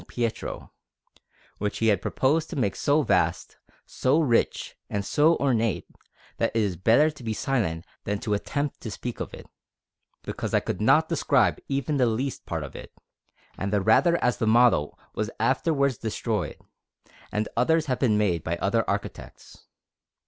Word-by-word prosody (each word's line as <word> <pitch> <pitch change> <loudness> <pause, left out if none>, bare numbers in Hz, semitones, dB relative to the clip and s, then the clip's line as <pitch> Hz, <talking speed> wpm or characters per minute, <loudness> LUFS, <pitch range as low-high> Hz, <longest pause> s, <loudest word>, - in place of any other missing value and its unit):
Pietro, 115 -2 -4 0.9
which 105 0 -2
he 115 - +2
had 100 -4 +2
proposed 155 +4 +1
to - - -6
make 105 -8 0
so 145 +2 +2
vast, 90 -7 0 0.3
so 135 +5 +1
rich, 125 -8 +1
and 100 -1 -2
so 155 +8 +4
ornate, 115 -7 0 0.5
that - - +1
it - - +3
is 100 -4 0
better 115 - +4
to 150 - -15
be 110 -1 -2
silent 100 -13 -1 0.2
than 105 0 -1
to 105 - -1
attempt 140 +7 -2
to 110 - -5
speak 120 +3 -6
of - - -4
it, - - -10 0.8
because - - -3
I - - +5
could 90 - -4
not 155 +9 +4
describe 130 - +2
even 140 +1 -1
the 125 -2 +3
least 125 +4 -3
part - - -3
of - - -9
it, - - -10 0.7
and 100 +1 -2
the 105 - +2
rather 140 - +4
as 125 - +2
the 110 - -1
model 115 -10 +4 0.2
was - - -2
afterwards 140 -6 +1
destroyed, 110 - -2 0.7
and 105 +1 -1
others 155 +7 +2
have 130 -3 -1
been 110 -6 +3
made 90 -6 +1
by 85 - -1
other 110 +6 +1
architects. - - -6
115 Hz, 165 wpm, -26 LUFS, 105-140 Hz, 0.9 s, I